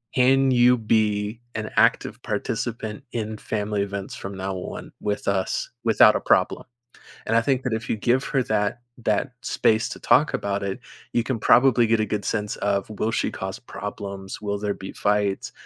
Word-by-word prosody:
can 135 +1 +4
you 125 0 +5
be 110 0 0
an 110 -1 -4
active - - +2
participant 110 -2 -3
in 110 -2 -3
family 105 -1 -2
events 100 -1 -4
from 100 0 -7
now 95 0 -3
on 90 - -7
with 105 -1 -2
us 95 -1 0
without 115 -2 +6
a - - +1
problem?" - - +2 0.6
And 115 - +2
I 115 - +6
think 130 +1 +1
that 125 - -1
if 110 0 -4
you - - +1
give 125 +5 +1
her 135 -3 +1
that 110 +2 0 0.2
that 110 +3 0
space 110 0 +1
to - - -7
talk - - +3
about 100 0 -1
it, 95 -1 -3 0.4
you 120 - +2
can 130 -2 -2
probably 120 +1 +5
get 115 0 +2
a - - +2
good 105 -1 -2
sense 105 -2 -2
of 100 -1 0
will 110 +1 -1
she - - 0
cause 95 0 -5
problems, 100 -4 -7
will 100 -1 -2
there 105 -1 -2
be 95 - -8
fights, 105 -1 0
105 Hz, 185 wpm, -24 LUFS, 100-115 Hz, 0.6 s, without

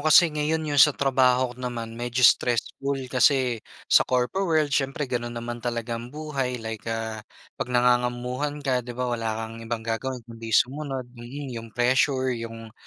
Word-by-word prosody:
kasi 155 +2 +6
ngayon 155 +1 0
yung 145 -2 +2
sa 150 0 +7
trabaho 130 -2 +3
ko 125 - -14
naman 120 -2 -4
medyo 120 +2 -1
stressful 125 +4 +3 0.2
kasi 130 -3 +3 0.2
sa - - +5
corpo 130 +10 0
world 155 -3 +2
siyempre 135 +1 0
gano'n 120 -2 -3
naman 120 0 -5
talaga 115 -1 -3
ang 120 - -8
buhay 140 -3 -3
like, 110 -1 -6
ah, 110 -1 -3 0.4
'pag - - -2
nangangamamuhan 125 +3 +1
ka, 130 -2 +2
'di 120 0 -8
ba, 125 - -1
wala 115 -1 -2 0.2
kang 115 +1 -9
ibang 115 0 -4
gagawin 120 +2 -3
kundi 115 -1 -9
sumunod. 135 -1 0
Mm, 130 +3 -7
yung 115 -1 -7
pressure, 130 +3 +2
yung 115 -1 -7
125 Hz, 170 wpm, -25 LUFS, 115-135 Hz, 0.4 s, sa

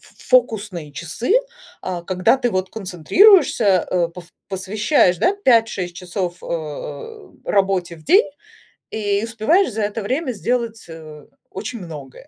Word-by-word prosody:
ф - - -21
фокусные 205 - 0
часы, 170 - -3 0.5
а 180 -2 -4
когда 185 +7 +2
ты 245 -2 -1
вот 185 -2 -2
концентрируешься, 200 - +4
э, 175 -2 +1
пов 175 +1 -11 0.2
посвящаешь, 195 - +1
да, 390 - +2
5-6 225 -7 +2
часов, 180 -1 -4
э, 165 - -6 0.2
работе 190 -4 0
в 155 - -18
день, 385 +9 +5 0.6
и 205 -1 -1
успеваешь 230 - +1
за 220 +1 -2
это 210 +2 -2
время 260 +6 -2
сделать, 235 0 -2
э, 155 -2 -11 0.3
очень 215 +4 -6
многое. 150 -7 -10
200 Hz, 130 wpm, -20 LUFS, 175-235 Hz, 0.6 s, день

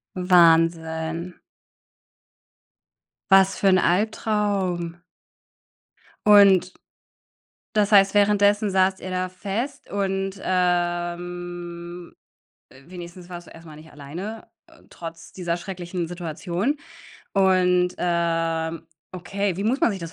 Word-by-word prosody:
Wahnsinn. 165 -1 +2 1.9
Was 195 0 +5
für 200 - +1
'n 185 -1 +5
Albtraum. 190 -3 0 1.3
Und 195 -3 +6 1.0
das 210 -1 +1
heißt, 195 -1 +6
währenddessen 205 0 +3
saßt 190 0 +2
ihr 185 - -7
da 185 0 -2
fest 205 +8 -5
und, 195 -1 -2
ähm, 175 -1 -3 0.6
äh, 130 - -16
wenigstens 175 0 -10
warst 175 -1 -9
du - - -14
erst 165 0 -14
mal 155 -1 -11
nicht 155 +1 -15
alleine, 175 +10 -8 0.2
äh, - - -21
trotz 165 -1 -10
dieser 175 -2 -3
schrecklichen 175 -1 -5
Situation. 175 - -3 0.5
Und, 180 -2 +3
ähm, 165 -1 -1 0.3
okay, 185 +1 -3
wie 195 - -3
muss 255 +6 +1
man 285 - +4
sich 195 - -5
das 165 0 -7
180 Hz, 105 wpm, -23 LUFS, 170-195 Hz, 1.9 s, Und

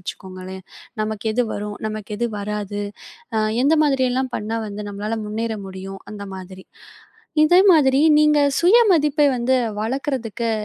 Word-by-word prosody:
வச்சுக்கோங்களேன். 185 0 -8 0.4
நமக்கு 215 0 -4
எது 245 +1 +1
வரும்? 205 0 -5
நமக்கு 215 0 -7
எது 235 0 0
வராது? 205 0 -4 0.5
அ - - +3 0.3
எந்த 315 +3 +4
மாதிரி 270 -3 +2
எல்லாம் 260 0 -1
பண்ணா 220 +2 -3
வந்து 205 +1 -6
நம்மளால 210 +3 -3
முன்னேற 220 +1 -3
முடியும்? 190 +1 -8
அந்த 205 -1 -8
மாதிரி. 185 0 -10 0.8
இதே 350 +4 +6
மாதிரி 275 -4 +4 0.2
நீங்க 300 -1 +4 0.2
சுயமதிப்பை 340 - +4
வந்து 245 +2 +1 0.3
வளக்கறதுக்கு 235 -1 -2
225 Hz, 135 wpm, -21 LUFS, 205-270 Hz, 0.8 s, இதே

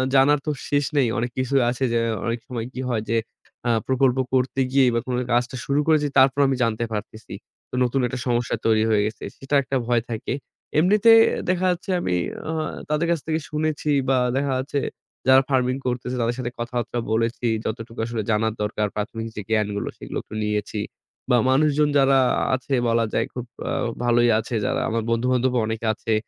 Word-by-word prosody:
জানার 140 +2 +5
তো 155 - 0 0.2
শেষ 145 0 +2
নেই। 135 -4 +4
অনেক 120 +1 -1
কিছু 130 +1 -1
আছে 125 +2 -2
যে 115 - +3 0.3
অনেক 115 +1 -1
সময় 120 -3 -4
কি - - -7
হয় 115 -3 0
যে 115 - +2 0.5
আ - - +2 0.2
প্রকল্প 130 -1 +2 0.2
করতে 130 +1 +1
গিয়েই 135 -2 +5
বা - - +3
কোনো 125 -1 -1
কাজটা 120 +1 +1
শুরু 140 +1 +1
করেছি 155 -2 +3
তারপর 135 +1 +5
আমি 135 - +1
জানতে 115 0 0
পারতেছি 110 +1 -6 0.4
তো - - -6
নতুন 125 +2 0
একটা 125 +1 -5
সমস্যা 120 -1 0
তৈরি 110 -1 +4
হয়ে 105 -2 +3
গেছে। 110 - -5
সেটা 135 +2 -2
একটা 135 - -3
ভয় 120 -1 +2
থাকে। 115 0 -3 0.4
এমনিতে 205 +7 +5 0.4
দেখা 185 0 +1
যাচ্ছে 180 +2 -5
আমি 90 - 0 0.3
আহ 160 0 -1 0.3
তাদের 150 +2 +1
কাছ 170 - +1
থেকে 160 0 0
শুনেছি 155 0 -2 0.2
বা 135 - +4 0.2
দেখা 140 0 0
যাচ্ছে 140 +2 -2 0.5
যারা 130 0 +7
farming 130 -1 +1
করতেছে 125 0 -2
তাদের 115 +1 0
সাথে 120 -1 -3
কথাবার্তা 120 0 -3
বলেছি 115 +2 0 0.2
যতটুকু 115 +1 -5
আসলে 115 -1 -3
জানার 110 +1 +1
দরকার 105 0 -1
প্রাথমিক 115 +2 -4
যে 105 - -4
জ্ঞানগুলো 105 -2 0
সেগুলো - - -6
একটু - - -10
নিয়েছি 105 0 -2 0.5
বা 125 - +5
মানুষজন 150 +2 +3
যারা 135 -1 +5 0.4
আছে 130 +2 -5
বলা 115 0 +2
যায় - - +1
খুব 125 -1 -5 0.2
আ - - -1 0.3
ভালোই 120 0 +4
আছে। 115 +2 -4
যারা 130 +1 0
আমার 115 0 -1
বন্ধু-বান্ধবও 125 +2 +1
অনেকে 110 +1 -3
আছে 110 +1 -2
125 Hz, 185 wpm, -23 LUFS, 115-135 Hz, 0.5 s, যারা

